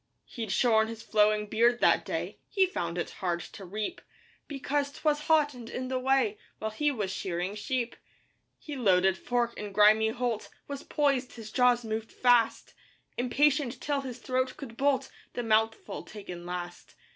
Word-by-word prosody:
He'd 225 -5 -5
shorn 220 0 +4
his 225 0 -7
flowing 210 0 +3
beard 235 +3 +3
that - - +4
day - - -4
He 385 -2 +4
found 175 - -3
it 175 - -2
hard 175 -2 -2
to 195 - -10
reap 210 +4 -4 0.5
Because 285 0 -1
'twas 295 0 0
hot 305 -2 +4
and 240 -2 -9
in 255 0 -4
the 260 0 0
way 270 +11 +2 0.2
While 220 - -3
he 295 +7 +1
was 210 -9 -2
shearing 185 0 -3
sheep. 240 +3 -2 0.6
His 295 -3 -7
loaded 190 -4 +4
fork 240 +2 -1
in 210 -1 -5
grimy 215 +2 +5
holt 235 -1 -2 0.2
Was 280 -1 -5
poised, 275 -4 0
his 220 -2 -9
jaws 245 -1 +3
moved 220 0 -3
fast, 245 -2 +2 0.4
Impatient 270 0 +2
till 285 0 -1
his 255 -3 -6
throat 255 +1 -1
could 240 -5 -8
bolt 275 0 +1 0.2
The 245 - -3
mouthful 220 0 +1
taken 180 -5 -9
last. 175 0 -6
235 Hz, 165 wpm, -29 LUFS, 210-265 Hz, 0.6 s, grimy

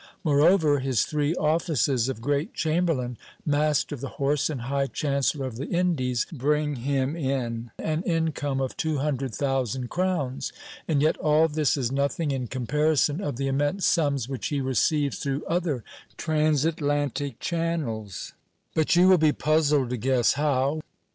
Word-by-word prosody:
Moreover, 155 0 +4
his 130 -5 +1
three 150 +1 0
offices 150 -6 +1
of 115 -4 -5
great 145 +4 -1
chamberlain, 155 -7 0 0.3
master 150 0 +1
of 135 - -7
the 140 - -3
horse, 145 +2 +1
and 140 -6 -4
high 135 +3 -1
chancellor 140 +2 -1
of 125 -4 -6
the 140 +5 -4
Indies, 145 -9 0
bring 150 +1 0
him 135 +3 -1
in 125 -6 -2
an 155 0 -1
income 160 -6 -1
of 130 - -3
two 160 -2 -1
hundred 135 -4 -2
thousand 130 -2 -1
crowns; 175 -8 -1 0.4
and 150 -3 +2
yet 155 - +2
all 155 +1 +3
this 150 -3 +1
is 125 -3 -1
nothing 140 +3 0
in 130 -2 -2
comparison 150 - +1
of 145 -9 -3
the 135 +3 -2
immense 145 +8 0
sums 140 -7 +1
which 135 -2 -4
he 145 - -1
receives 140 +2 +1
through 140 +1 -2
other 165 -8 -1 0.3
transatlantic 145 -3 0
channels; 155 - -3 0.4
but 160 +1 +2
you 180 +1 +6
will 185 -2 +6
be 155 -1 +4
puzzled 150 -4 +2
to 125 - -1
guess 125 0 +2
how. 145 +1 0
145 Hz, 155 wpm, -26 LUFS, 130-155 Hz, 0.4 s, you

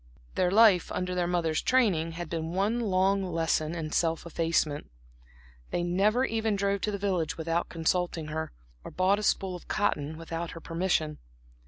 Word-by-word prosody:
Their 180 - +2
life, 205 -3 +5
under 180 0 -2
their 180 -1 0
mother's 170 -3 0
training, 190 -11 +2
had 175 0 -5
been 165 0 -4
one 205 +6 +1
long 195 -2 +2
lesson 165 -2 0
in 155 -2 -4
self 165 0 0
effacement; 165 -3 0 0.8
they 175 - -1
never 205 +8 +2
even 220 -2 0
drove 200 0 0
to 210 - -1
the 200 - -2
village 185 -4 -1
without 165 +1 -1
consulting 165 -1 -1
her, 160 +1 -3 0.3
or - - -7
bought 190 +3 +2
a - - -3
spool 190 -2 0
of 175 - -11
cotton 155 -7 -1
without 165 +1 -5
her - - -6
permission. 165 -3 -1
175 Hz, 170 wpm, -28 LUFS, 165-195 Hz, 0.8 s, life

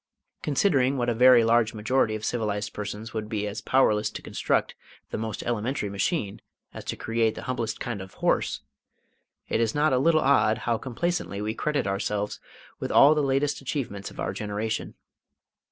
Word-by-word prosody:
Considering 140 -3 +2
what 120 -1 0
a - - +2
very 125 0 +7
large 115 -1 +3
majority 110 +1 +1
of 105 0 -5
civilised 105 -3 -2
persons 105 +2 -6
would 110 -1 -4
be 105 -2 -2
as 105 +1 -4
powerless 105 -5 +3
to - - -8
construct - - 0 0.4
the - - -2
most 110 -2 -4
elementary 115 -2 -2
machine 100 - -1 0.3
as - - -8
to - - -4
create 115 -1 0
the - - -7
humblest 120 -3 -3
kind 120 -6 -4
of 95 0 -11
horse, 70 - 0 0.9
it 115 - 0
is 115 +2 0
not 150 -1 +3
a 125 - +3
little 155 +3 +4
odd 130 -5 +3
how 120 - +2
complacently 120 - -2
we 105 +1 -2
credit 150 +3 -1
ourselves 100 +1 -2 0.4
with - - -3
all 145 +2 +7
the 150 - +1
latest 140 +1 0
achievements 120 -8 -4
of - - -14
our - - -2
generation. 105 +1 -3
115 Hz, 175 wpm, -26 LUFS, 105-135 Hz, 0.9 s, very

